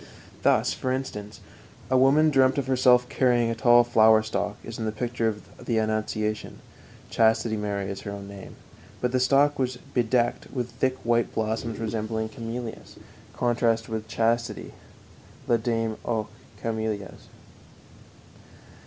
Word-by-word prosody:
Thus, - - +3
for 130 - -3
instance, 110 -5 -5 0.5
a - - +4
woman 140 +4 +5
dreamt 130 -1 +4
of 140 - 0
herself 125 -1 +4
carrying 120 -3 +2
a - - -2
tall 120 +1 +6
flower 110 -2 +5
stalk, 105 -1 -3
as 115 0 -7
in 110 - -2
the 110 - -1
picture 120 +1 -2
of 105 -1 -6
the 115 - 0
Annunciation 110 -1 -2 0.5
(Chastity 110 0 +2
Mary 100 -2 -2
is 100 0 -5
her - - -6
own 100 -1 -7
name), 100 -1 -10 0.4
but 125 - 0
the 130 - +1
stalk 140 +3 +3
was 130 -1 -1 0.2
bedecked 120 0 +1
with 125 -2 -3
thick 130 +2 -1
white 120 0 +1
blossoms 110 0 -2
resembling 110 0 -3
camellias 115 +1 -7 0.4
(contrast 115 -2 +1
with 110 -1 -4
chastity: 115 0 -1 0.7
La 120 - +4
dame 115 -1 -1
aux 110 -2 -1 0.4
Camelias). 110 -3 -4
115 Hz, 140 wpm, -26 LUFS, 110-125 Hz, 0.7 s, tall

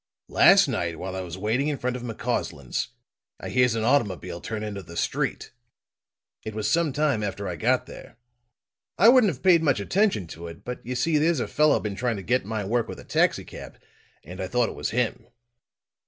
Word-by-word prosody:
Last - - +6
night 85 -1 -2
while 95 +2 -5
I 95 - -3
was 90 -1 -7
waiting 110 +8 0
in 150 -2 -1
front 125 -1 -2
of 125 - -5
McCausland's, 115 - -3 0.5
I - - -6
hears 125 -2 +3
an 110 - -1
automobile 95 -9 0
turn 110 -1 -4
into 100 -2 -5
the 85 -1 -11
street. - - -2 0.9
It 110 -1 -6
was 110 -1 -1
some 165 -2 +2
time 145 -5 +1
after 100 -1 -3
I 90 - -3
got 80 - +1
there. - - -12 0.8
I 215 +6 +7
wouldn't 245 -6 +6
have 135 - -11
paid 175 -3 +6
much 145 -8 +2
attention 185 - +1
to 85 +1 -8
it, 85 -1 -11
but 125 0 -6
you 125 +2 -4
see 150 +5 +2
there's 160 -1 +2
a - - -2
fellow 150 0 +3
been 105 -2 -4
trying 115 +2 -1
to 95 - -7
get 120 +2 +1
my 110 -1 -3
work 115 +3 0
with - - -8
a - - -10
taxicab, - - -1 0.5
and 90 +4 -8
I 95 - -2
thought 120 +3 +1
it - - -8
was - - -3
him." 115 -1 -1
115 Hz, 205 wpm, -25 LUFS, 95-135 Hz, 0.9 s, I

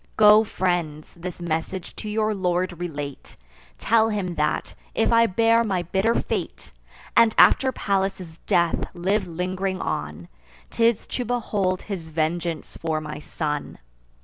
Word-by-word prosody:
Go, 215 0 +7
friends, 175 -7 -2
this 175 +1 -7
message 170 +2 -3
to 215 - -6
your 215 0 0
lord 180 -2 -1
relate: 145 -5 -6 0.4
Tell 225 0 +3
him, 200 -5 -2
that, 150 -2 -1 0.2
if 225 - +2
I 230 0 +5
bear 230 +3 +3
my 190 -5 -1
bitter 195 +7 +1
fate, - - -3 0.4
And, 230 -1 +5
after 265 -1 +6
Pallas' 190 -6 -2
death, 170 -1 +2
live 190 +3 0
ling'ring 185 +2 -2
on, 75 +3 -4 0.4
'Tis 230 -1 +2
to 250 - -3
behold 205 -6 -1
his 180 -6 -6
vengeance 160 +1 -2
for 160 -1 -1
my 150 -1 -7
son. 150 -1 -4
185 Hz, 135 wpm, -24 LUFS, 165-210 Hz, 0.4 s, Go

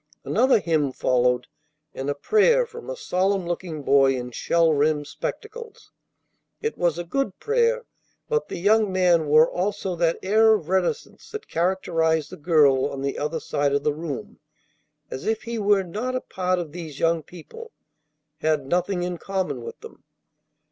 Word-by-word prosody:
Another 255 +5 +3
hymn 155 -7 0
followed, 125 -1 +1 0.5
and 135 +1 -4
a 145 - -1
prayer 475 - +3
from 470 +1 -10
a - - -3
solemn 190 - 0
looking 170 -3 -4
boy 135 -1 +4
in 125 -1 -5
shell 165 +6 +2
rimmed 150 0 +1
spectacles. 440 - -7 0.7
It 450 - -3
was 170 -2 0
a 175 - -3
good 200 +2 -2
prayer, 475 +1 +1 0.4
but 455 -1 0
the - - -6
young 210 +3 +3
man 175 -4 +3
wore 155 +2 +6
also 190 0 -2
that 170 0 +1
air 220 +3 +5
of 175 -7 -6
reticence 185 -1 -2
that 430 0 -7
characterized 165 -3 0
the - - -8
girl 145 -5 +3
on 135 -1 -6
the 140 - -2
other 150 +2 -2
side 145 -1 -1
of 140 0 0
the 150 - +1
room, 150 -3 -6 0.7
as 130 - -6
if 220 0 0
he 235 -1 -4
were 205 -1 +3
not 220 +8 -4
a 255 - -1
part 185 0 -1
of 170 -4 -4
these 160 -4 -8
young 165 0 +2
people, 305 - -12 0.7
had 155 -3 0
nothing 180 +4 0
in 175 -1 -4
common 190 -10 -3
with - - -9
them. - - -13
175 Hz, 170 wpm, -24 LUFS, 150-210 Hz, 0.7 s, wore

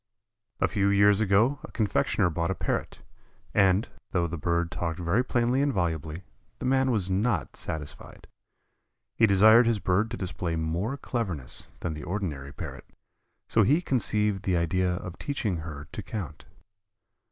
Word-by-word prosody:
A - - +3
few 100 -1 +1
years 100 +1 +5
ago 110 +7 +3
a - - -10
confectioner 105 -5 +1
bought 85 +1 -1
a 95 - -1
Parrot, - - -3 0.5
and, 100 +1 +3 0.3
though 90 -2 +2
the 85 0 -3
bird 85 +1 -1
talked 85 -1 -3
very 90 +7 +1
plainly 125 +1 +1
and 145 0 +2
volubly, 80 - -2 0.3
the - - -6
man 130 0 +3
was 100 -6 +2
not 105 +6 0
satisfied. 75 -2 -7 0.9
He 110 - +5
desired 110 +4 +6
his 115 -2 +2
bird 100 +3 +1
to - - -5
display 90 -3 -3
more 85 - -2
cleverness 95 - -4
than 85 - -2
the 75 - -7
ordinary 80 -7 -4
Parrot, - - -8 0.6
so 110 - +3
he 140 - +4
conceived 105 - 0
the 90 -2 +1
idea 90 +2 +1
of 90 0 -7
teaching 110 -10 -2
her 75 -3 -7
to - - -5
count. 85 -9 -6
95 Hz, 155 wpm, -27 LUFS, 85-110 Hz, 0.9 s, desired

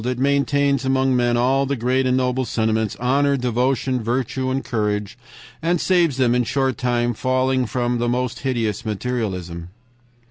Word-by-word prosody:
It 125 +1 -2
maintains 140 +1 +1
among 130 0 +2
men 120 -1 +2
all 135 +3 +2
the 140 - 0
great 130 +2 +1
and 125 0 +2
noble 130 0 0
sentiments 110 -3 -1
honor, 140 +3 +1
devotion, 125 +1 0
virtue, 130 +3 -2
and 135 +1 -2
courage, 105 -3 -2 0.5
and 170 +1 +1
saves 170 -7 +2
them 125 -3 +3
in 125 0 +2
short 130 +1 -1
from 120 -1 +1
falling 130 +1 0
into 120 0 0
the 120 0 0
most 125 0 -2
hideous 115 -6 -2
materialism.' 95 -7 -4
125 Hz, 155 wpm, -21 LUFS, 120-130 Hz, 0.5 s, them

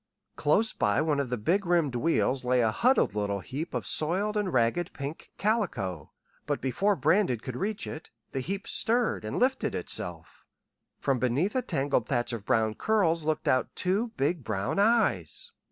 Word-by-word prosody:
Close 210 +10 +2
by 105 - +1
one 150 -2 +1
of 140 -3 -1
the 125 - -1
big 175 - +1
rimmed 170 -6 +2
wheels 135 -1 +1
lay 125 0 +2
a 110 -2 +2
huddled 245 - +3
little 100 -1 -1
heap 140 - -5
of - - -2
soiled 190 +7 0
and 205 -3 0
ragged 130 +8 +1
pink 140 +3 -7
calico; 120 - -1 0.4
but 145 -1 0
before 195 - +1
Brandon 160 - +2
could 125 +2 -7
reach 210 - -2
it, 155 - -8 0.2
the 135 - -2
heap 190 +9 -4
stirred, 235 - +1
and 110 - -4
lifted 260 +2 +1
itself. - - -4 0.6
From 135 -3 0
beneath 135 - 0
a 255 - +2
tangled 140 - 0
thatch 120 -2 -1
of 110 -3 -6
brown 110 -1 +2
curls 170 - +1
looked 155 -1 -1
out 130 -1 +1
two 195 +6 0
big 145 +2 0
brown 100 - -2
eyes. 205 - +1
150 Hz, 170 wpm, -28 LUFS, 120-200 Hz, 0.6 s, huddled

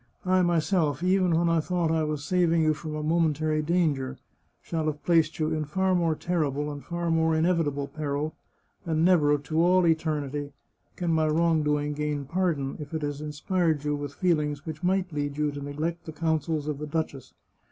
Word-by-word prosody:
I 185 0 +3
myself, 165 -3 +1
even 185 -2 +3
when 170 +1 +2
I 165 0 +3
thought 170 0 0
I 160 -1 +1
was 150 -2 -2
saving 170 0 +2
you 155 0 +3
from 155 0 -6
a 150 - -3
momentary 155 -1 +1
danger, 150 -5 0 0.4
shall 160 -2 -3
have 150 -1 -4
placed 165 -2 +3
you 155 0 0
in 155 -1 -1
far 190 +5 +1
more 170 -3 +2
terrible 150 -4 -1
and 145 -1 -8
far 170 -1 -2
more 160 0 +2
inevitable 160 -4 +1
peril, 150 0 -3 0.5
and 165 -2 +1
never, 150 -5 +4
to 155 +3 -1
all 180 +1 +4
eternity, 150 -3 -1 0.4
can 175 -2 -1
my 160 -1 +2
wrongdoing 150 -2 +1
gain 150 -1 -2
pardon, 160 -4 -1
if 150 +1 -6
it 155 - -3
has 145 0 -3
inspired 150 +1 0
you 150 0 0
with 145 -1 -6
feelings 150 -5 0
which 155 -1 -6
might 185 -1 0
lead 145 -1 -2
you 150 -1 +1
to 145 0 -7
neglect 155 +4 -4
the - - -4
counsels 160 -1 -1
of 150 -2 -3
the 150 - -5
duchess. 150 -4 -4
155 Hz, 185 wpm, -27 LUFS, 150-170 Hz, 0.5 s, never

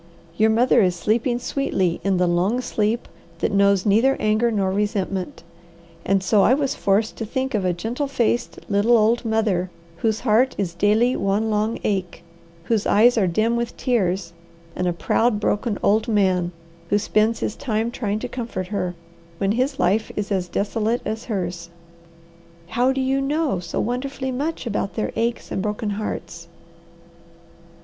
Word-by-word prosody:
"Your 220 +3 +3
mother 240 +2 +4
is 180 -3 +2
sleeping 230 +6 0
sweetly 190 -9 -1
in 195 -1 +1
the 180 - +3
long 180 +7 +1
sleep 225 -2 -1 0.3
that - - -1
knows 200 -1 +3
neither 225 +7 +3
anger 215 +2 +2
nor 200 -4 0
resentment; 195 -3 -2 0.6
and 195 0 +1
so 205 +2 +3
I 250 - +5
was 280 -2 0
forced 200 +3 0
to - - -3
think 260 +4 -2
of 205 -4 0
a 180 - +2
gentle 230 - -3
faced, 240 -2 0
little 215 +3 +3
old 225 +3 +2
mother 215 -5 0 0.3
whose 220 +3 0
heart 245 +2 +3
is 185 -4 -2
daily 215 +7 +2
one 205 +3 0
long 215 +2 0
ache, 185 -4 -2 0.4
whose 215 +2 0
eyes 235 +4 +5
are 205 -5 +2
dim 220 +7 +1
with 235 0 -3
tears, 190 -8 0 0.4
and 180 - -1
a - - +2
proud, 215 +5 +1
broken 210 0 0
old 215 +3 +3
man 185 -5 +2 0.4
who 205 - +3
spends 215 +2 +1
his 210 - -2
time 230 -3 -1
trying 210 -4 -2
to - - -4
comfort 230 -7 -5
her, 180 -4 -2 0.4
when 195 +1 0
his 260 +5 0
life 215 +3 +1
is 205 0 -3
as 185 -2 0
desolate 215 +5 -1
as 220 +2 -4
hers." 175 -5 -4 1.0
"How 245 +8 +2
do 265 0 -1
you 265 +1 +1
know 285 - 0
so 170 -2 -4
wonderfully 260 +3 -2
much 290 +4 -3
about 205 -3 -2
their 220 - -2
aches 235 +1 -2
and - - -1
broken 210 +1 -2
hearts?" 185 -5 -5
215 Hz, 165 wpm, -22 LUFS, 195-235 Hz, 1.0 s, I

